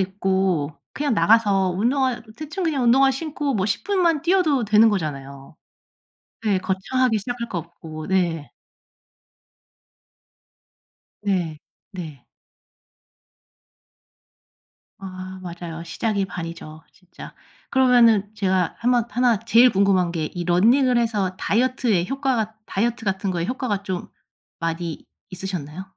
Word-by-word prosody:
입고 190 -5 0 0.2
그냥 290 -5 -1
나가서 205 -4 +3
운동화 245 +6 0
대충 310 +5 -5
그냥 285 -6 0
운동화 270 +3 +5
신고 285 -1 -3
뭐 195 -1 0
10 200 - -2
분만 345 -7 +1
뛰어도 325 - +2
되는 215 +2 +5
거잖아요. 140 -6 -4 0.9
네 200 -3 +2
거창하게 215 +6 0
시작할 235 +2 -5
거 175 - -3
없고 160 -2 -9
네. 175 -5 0 2.7
네. 180 -7 -1 0.3
네. 155 -8 -8 2.7
아 185 0 -8
맞아요. 170 -2 -7
시작이 200 +3 -1
반이죠 165 -3 -8
진짜. 185 -1 -13 0.4
그러면은 235 -6 +4
제가 190 -4 0
한번 240 -1 +2
하나 245 -3 +2
제일 235 +2 +5
궁금한 190 -3 +2
게 160 -3 -2
이 175 -1 -3
러닝을 240 +9 +4
해서 205 -6 -1
다이어트에 230 -5 +1
효과가 260 -6 -1
다이어트 230 +3 -1
같은 195 0 -1
거에 170 -2 -2
효과가 250 -6 -2
좀 185 -2 -4 0.5
많이 165 -1 -4 0.3
있으셨나요? 185 -1 -6
195 Hz, 245 characters per minute, -22 LUFS, 180-245 Hz, 2.7 s, 운동화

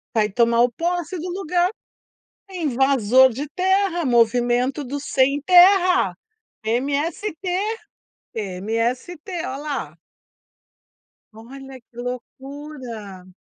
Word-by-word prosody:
Vai 210 -1 +2
tomar 235 +1 +3
o 245 0 +3
posse 345 +4 -2
do 355 +3 -5
lugar. 360 -1 0 0.8
Invasor 260 - +3
de 285 +5 -5
terra, 375 -2 +1
movimento 245 +3 +2
do 280 +2 -5
sem-terra, 355 +7 +4 0.5
MST, 285 - -1 1.0
MST. 230 - -3
Ó 260 - -4
lá. 275 - -5 1.4
Olha 265 +4 -11
que 235 0 -25
loucura. 250 -6 -8
270 Hz, 85 wpm, -22 LUFS, 235-335 Hz, 1.4 s, sem-terra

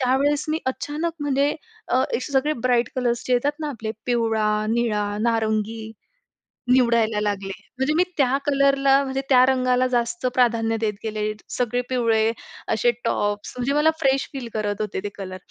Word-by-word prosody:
त्यावेळेस 280 +3 +2
मी 310 +1 0
अचानक 295 +5 -2
म्हणजे 285 0 +1 0.4
अ, - - +2
असे 260 +2 -2
सगळे 275 +3 +2
ब्राईट 245 -2 +2
कलर्स 240 -2 0
जे 255 - 0
येतात 250 +4 +2
ना 305 - -2
आपले 225 -5 -5 0.2
पिवळा, 220 -3 +1
निळा, 225 -3 +1
नारंगी 220 -1 -1 0.8
निवडायला 235 -4 +3
लागले. 200 -2 -2 0.3
म्हणजे 265 +3 +1
मी 355 - +5
त्या 270 -2 +3
कलरला 275 -1 +4
म्हणजे 265 0 -2
त्या 255 -2 +7
रंगाला 255 -1 +2
जास्त 240 +6 -1
प्राधान्य 225 -2 +2
देत 215 -2 0
गेले. 215 -1 -2 0.2
सगळे 245 0 -1
पिवळे 225 -3 +2 0.4
असे 240 +2 +3
टॉप्स 205 -2 -1
म्हणजे 250 +3 0
मला 300 +2 +4
फ्रेश 270 -2 +2
फील 265 -3 -5
करत 210 -1 -2
होते 210 -3 -3
ते 205 - -3
कलर. 185 -2 -6
245 Hz, 160 wpm, -23 LUFS, 220-270 Hz, 0.8 s, त्या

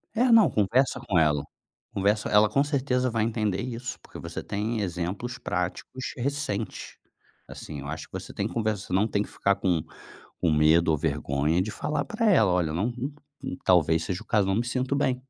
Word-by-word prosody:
É, 245 +1 +3
não, 225 -2 +7
conversa 115 +6 +2
com 90 -4 +1
ela, 75 -3 +2 0.5
conversa 105 +2 +1
ela 105 +1 +5
com 140 +7 +3
certeza 130 -3 0
vai 115 -1 +1
entender 110 -4 0
isso, 120 0 -5
porque - - -12
você - - -6
tem 105 +2 -2
exemplos 95 +7 -3
práticos 90 +7 -4
recentes, 125 -5 -3 0.5
assim, 75 -2 -8
eu 70 - -7
acho 80 +2 -5
que - - -46
você - - -6
tem - - -1
que - - -9
conversar 110 -5 -2
não 100 +4 +3
tem 100 -1 0
que - - -4
ficar 100 0 +1
com 90 -6 0 0.6
com 85 - +2
medo 80 +3 +4
ou 75 - +2
vergonha, 75 +6 0
de 105 - -3
falar 150 +4 -2
para 220 -1 +1
ela, 110 - +5
olha 90 -3 +1
eu - - -3
não 110 +7 0 0.5
não 130 -9 -5
talvez 80 -3 +4
seja 90 -1 -3
o - - -12
caso 105 -4 +2
não 95 - +1
me 115 +3 0
sinto 130 +2 -1
bem, 130 -2 +2
105 Hz, 200 wpm, -27 LUFS, 90-125 Hz, 0.6 s, não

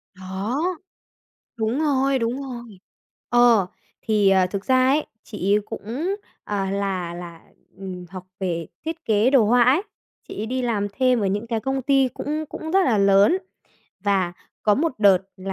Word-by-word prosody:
Đó, 190 +8 -3 1.0
đúng 225 +4 -1
rồi, 275 -3 +2
đúng 240 +3 -2
rồi. 240 -6 -9 0.5
Ờ, 240 -5 +5 0.3
thì, 210 -3 +2
à, 190 -1 +4
thực 195 +1 -5
ra 255 0 +4
ấy, 290 +3 +2 0.2
chị 200 -2 -1
ấy 210 - +4
cũng, 285 - -4 0.3
ờ, 200 -2 -2
là 190 -3 -2
là, 170 -1 -9 0.4
ừm, 185 -2 -7
học 185 0 -8 0.2
về 170 -4 -2 0.2
thiết 325 +1 -5
kế 215 +2 +3
đồ 265 -5 +5
họa 240 +3 +5
ấy, 265 +8 +4 0.5
chị - - -8
ấy 215 - -2
đi 255 +3 -2
làm 220 -5 0
thêm 255 +1 +2
ở 205 - 0
những 205 +4 -2
cái 230 -1 -1
công 270 +3 -2
ty 270 0 +3
cũng 305 +2 -3
cũng 320 - -6
rất 385 +1 +4
là 230 -5 +2
lớn 200 - +5 0.7
và 190 -3 +1 0.3
có 210 - +4
một 320 +5 0
đợt 200 -3 +6 0.2
là, 195 0 -5
220 Hz, 175 wpm, -23 LUFS, 195-260 Hz, 1.0 s, đợt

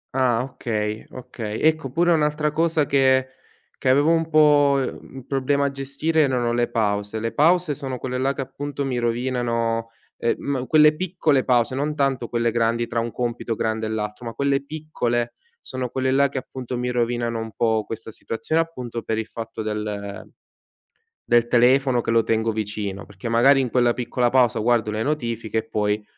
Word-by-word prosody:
Ah, 125 -3 +2
okay, 110 -4 -3
okay. 115 -4 -6
Ecco, 155 -3 +2
pure 170 +6 +2
un'altra 150 -1 +1
cosa 160 -1 +1
che 130 -1 +3 0.5
che 130 - +3
avevo 145 +5 +4
un 165 -1 +1
po', 145 -3 +5
mhmm, 135 0 -6
un 130 -2 -9
problema 140 +1 +1
a 140 - 0
gestire, 140 +4 -1
erano 125 -4 +1
le 120 0 +1
pause. 105 -1 -1
Le 115 +1 -3
pause 170 +1 +3
sono 135 -3 -5
quelle 125 +1 -4
là 135 +1 +1
che, - - -12
appunto, 140 +1 -5
mi 130 -2 -2
rovinano 115 -1 -1 0.3
ehm, 115 - 0
mhmm, 130 -3 -3
quelle 150 -1 +6
piccole 160 -6 +1
pause, 120 -1 +2
non 145 +3 -1
tanto 135 -4 0
quelle 115 -1 0
grandi, 115 +1 +1
tra 115 - -1
un 115 0 -3
compito 120 0 -3
grande 110 0 -1
e - - -4
l'altro, 105 +2 -4
ma 115 - -5
quelle 140 +1 0
piccole, 125 -6 -2 0.3
sono 130 -1 -4
quelle 130 +1 -1
là 140 +1 +3
che, 135 - -6
appunto, 130 -1 -5
mi 125 0 -2
rovinano 120 -1 -1
un 115 0 -5
po' 110 +1 +1
questa 115 +1 -7
situazione, 135 +9 -1
appunto, 125 -8 -5
per 110 0 -2
il 110 - -2
fatto 115 -1 -7
del 105 -2 -5 1.0
del 120 0 +4
telefono 125 +1 +4
che 115 - -3
lo 115 0 +4
tengo 115 0 +1
vicino, 105 -2 -4
perché 105 +2 -7
magari 135 +4 +5
in 130 -2 -1
quella 120 -1 +3
piccola 125 0 0
pausa 125 -3 +3
guardo 115 -1 +2
le 105 +1 -2
notifiche 115 -6 -2
e 110 0 -4
poi 105 -1 0
125 Hz, 185 wpm, -23 LUFS, 115-140 Hz, 1.0 s, quelle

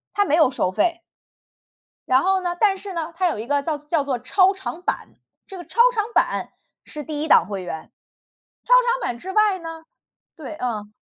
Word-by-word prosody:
它 410 - +4
没 295 - -1
有 315 -5 +5
收 185 -8 -1
费。 340 - 0 1.1
然 255 +1 +4
后 380 +1 +2
呢， 350 -1 -3
但 395 -3 +3
是 400 - -6
呢， 335 -1 -4
它 365 +2 +1
有 330 - -2
一 220 - -5
个 285 +2 +1
叫 305 +1 -2
叫 295 +1 -1
做 275 -3 -2
超 370 - +3
长 380 -3 -6
版， - - -2 0.4
这 385 - -10
个 350 - -8
超 465 - -9
长 430 -3 0
版 - - +1 0.3
是 300 - -7
第 295 0 -4
1 310 - -2
档 - - +6
会 200 -2 -4
员， 165 -3 -7 0.7
超 - - -2
长 - - 0
版 235 - -3
之 370 +10 -7
外 420 -1 +3
呢， 325 -1 -9 0.5
对， 315 -4 -8
嗯 215 -6 -4
325 Hz, 210 characters per minute, -22 LUFS, 270-380 Hz, 1.1 s, 档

